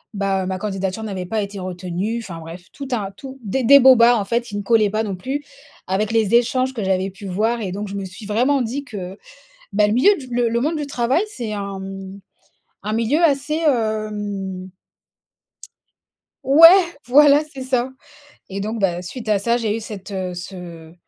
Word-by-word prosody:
bah, 195 -2 -1
ma 190 0 -2
candidature 195 +1 -3
n'avait 190 -4 -5
pas 215 +3 -1
été 200 0 -7
retenue 185 +4 -3
enfin 170 -6 -8
bref, 165 +2 -10
tout 275 - -7
un 205 -5 -2
tout 265 +6 -10
des 220 +6 -1
des 280 +4 +8
bobards 245 -3 +6
en 200 - -3
fait, 235 +4 0
qui 230 -4 -7
ne 205 - -4
collaient 215 -1 +3
pas 215 +2 -1
non 200 -3 -3
plus 265 +10 -4 0.4
avec 200 +3 -1
les 225 -2 +1
échanges 255 +2 +2
que 225 -5 -4
j'avais 190 0 0
pu 195 +2 -10
voir. 220 +5 0
Et 195 -4 -3
donc 205 +2 -5
je 200 - -6
me 200 -1 -4
suis 185 +4 -10
vraiment 250 +6 +1
dit 255 +5 -4
que, 195 -7 -8 0.5
bah, 210 +1 +4
le - - 0
milieu 280 - +5
du 270 -7 -10
le 240 0 +2
le 235 +1 0
monde 310 +4 0
du 295 -1 -4
travail 260 - +1
c'est 240 - -6
un, 200 -1 -4
hem, 195 0 -8 0.6
un 210 - -2
milieu 230 +8 +1
assez 290 -1 +1
hem 205 -6 -2 1.7
ouais! 335 +5 +7
Voilà, 290 +3 +6
c'est 265 - -7
ça. 255 -1 0 0.6
Et 195 +1 -5
donc, 220 +3 -3
bah, 180 -3 0
suite 220 +5 -7
à 210 -2 +3
ça 235 +4 +1
j'ai 220 -3 -1
eu - - -4
cette, 210 -3 -8
heu, 185 -2 -3
ce 175 -3 -9
215 Hz, 195 wpm, -20 LUFS, 195-245 Hz, 1.7 s, des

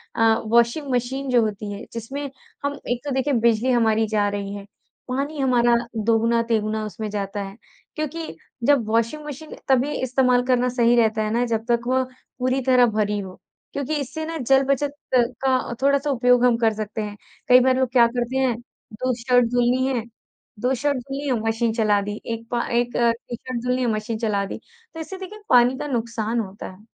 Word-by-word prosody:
अ, - - -1 0.2
washing 235 +5 +2
machine 260 +3 -1
जो 245 -2 +4
होती 210 0 -4
है 200 +3 -7
जिसमें 270 +5 -5 0.4
हम 285 0 -2
एक 245 0 -1
तो 285 - -2
देखिए 270 +2 +1
बिजली 235 +3 +2
हमारी 225 -2 +2
जा 210 -1 +1
रही 200 0 -4
है 200 -1 -8 0.4
पानी 280 +3 -2
हमारा 240 -3 +3 0.3
दोगुना-तिगुना 225 -1 +1
उसमें 215 0 -5
जाता 200 0 -3
है। 195 +2 -9 0.4
क्योंकि 310 - -4 0.3
जब 280 -2 +4
वॉशिंग 230 +7 0
मशीन 300 +2 -8
तभी 265 +2 +3
इस्तेमाल 250 -1 +2
करना 250 -1 +3
सही 240 -1 +3
रहता 220 -2 +2
है 215 - -2
ना 240 +1 +2
जब 225 -1 -2
तक 235 0 +3
वो 260 0 +2 0.4
पूरी 255 +1 +1
तरह 250 -1 +5
भरी 210 -1 +1
हो 190 -2 -7 0.4
क्योंकि 285 +2 -2
इससे 315 +4 -5
ना 325 0 -4
जल 270 0 +3
बचत 280 +1 0 0.2
का 255 +1 +1
थोड़ा-सा 280 +1 +2
उपयोग 250 -1 +4
हम 240 -2 +4
कर 225 -2 +2
सकते 215 0 -4
हैं। 210 0 -6 0.3
कई 250 0 +8
बार 260 0 +3
लोग 260 -2 +1
क्या 240 -2 +6
करते 245 +2 -2
हैं 260 -3 +2 0.4
2 255 +4 -1
शर्ट 245 -1 +4
धुलनी 245 +1 +2
है 245 -4 -1 0.6
2 250 +3 +1
शर्ट 285 +2 0
धुलनी 275 +3 -5
है 250 -4 +1
मशीन 225 0 +1
चला 215 -3 +2
दी 205 +1 -5
1 230 0 -7
पा 240 0 0
1 240 0 0
टी-शर्ट 235 +1 -1
धुलनी 250 +1 0
है 245 - +1
मशीन 215 +1 -3
चला 205 -3 0
दी - - -6 0.4
तो 325 - -8
इससे 375 +4 -6
देखिए 390 +3 -9
पानी 250 +1 +5
का 295 - -3
नुकसान 230 -2 -2
होता 200 -2 -6
है। 200 +4 -17
240 Hz, 190 wpm, -23 LUFS, 225-265 Hz, 0.6 s, कई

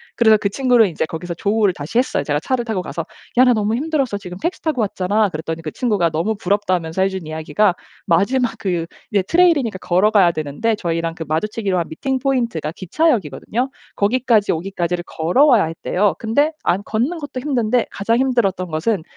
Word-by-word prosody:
그래서 220 -2 +5
그 200 -1 -1
친구를 245 -2 +3
이제 160 -2 -2
거기서 170 +2 -6
조우를 205 +1 +1
다시 175 +9 -2
했어요. 250 - 0
제가 145 +1 0
차를 240 - -1
타고 220 -6 -2
가서 165 +1 -5 0.3
"야 255 - +8
나 250 - +5
너무 215 0 0
힘들었어. 275 -5 -1
지금 180 -3 -9
택시 345 - -2
타고 300 -7 0
왔잖아." 205 +1 +1
그랬더니 160 0 -5
그 155 - -3
친구가 205 -9 +1
너무 170 +8 -1
부럽다면서 185 -4 0
해준 190 -4 -2
이야기가 160 +5 +1 0.3
마지막 225 +8 +2
그 175 -4 -1 0.3
이제 200 -2 +3
trail 350 0 +5
이니까 230 -8 -2
걸어 185 +5 +2
가야 190 -5 +5
되는데 155 +9 -2
저희랑 165 -4 -2
그 160 - -6
마주치기로 195 +4 -1
한 170 - -1
meeting 260 - -2
point 245 -10 0 0.2
기차역이거든요. 245 - 0 0.3
거기까지 225 0 +2
오기까지를 175 0 -2
걸어와야 230 - +3
했대요. 180 +5 0
근데 285 +8 +1
안 190 - +1
걷는 255 +11 -1
것도 290 -4 -6
힘든데 250 -4 +1
가장 225 +4 0
힘들었던 235 -8 +1
것은 160 +4 -1
205 Hz, 470 characters per minute, -19 LUFS, 175-240 Hz, 0.3 s, 야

